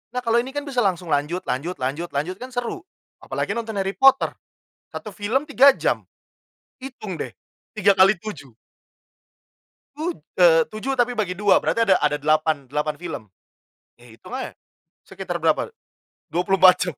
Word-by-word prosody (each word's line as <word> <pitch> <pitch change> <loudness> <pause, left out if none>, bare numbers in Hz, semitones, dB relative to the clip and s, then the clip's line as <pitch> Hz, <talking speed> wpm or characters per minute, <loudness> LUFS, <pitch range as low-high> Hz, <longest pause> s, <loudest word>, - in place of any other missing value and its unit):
Nah 250 - 0
kalau 230 0 +3
ini 265 +4 -5
kan 290 - -2
bisa 270 -4 -2
langsung 180 -6 0
lanjut 150 +6 0
lanjut 160 +8 -3
lanjut 145 +7 -2
lanjut 175 +7 -2
kan 255 - -6
seru. 245 +8 -4 0.4
Apalagi - - -3
nonton 225 -2 -4
Harry 195 -1 -1
Potter, 270 +4 +4 0.6
1 215 - -6
film 215 +7 -1
3 275 0 +7
jam. - - -1 0.8
Hitung 230 -8 -7
deh, 160 - -5 0.5
3 200 0 +5
kali 190 0 +5
7. 150 - -9 1.4
Tu 310 - -6 0.4
eee, - - +6
7 265 +5 -3
tapi 245 0 +2
bagi 190 -5 -2
2, 205 -1 +4
berarti 230 0 +1
ada 190 -2 +5
ada 150 0 +2
delapan 155 -1 +1
delapan 150 +3 -2
film. 165 -9 -6 0.8
Iya - - -18
hitung - - -14
aja, - - -6 0.5
sekitar - - -6
berapa, 455 - +1 0.5
24 180 +1 +4
jam. - - -8
195 Hz, 155 wpm, -23 LUFS, 165-245 Hz, 1.4 s, 3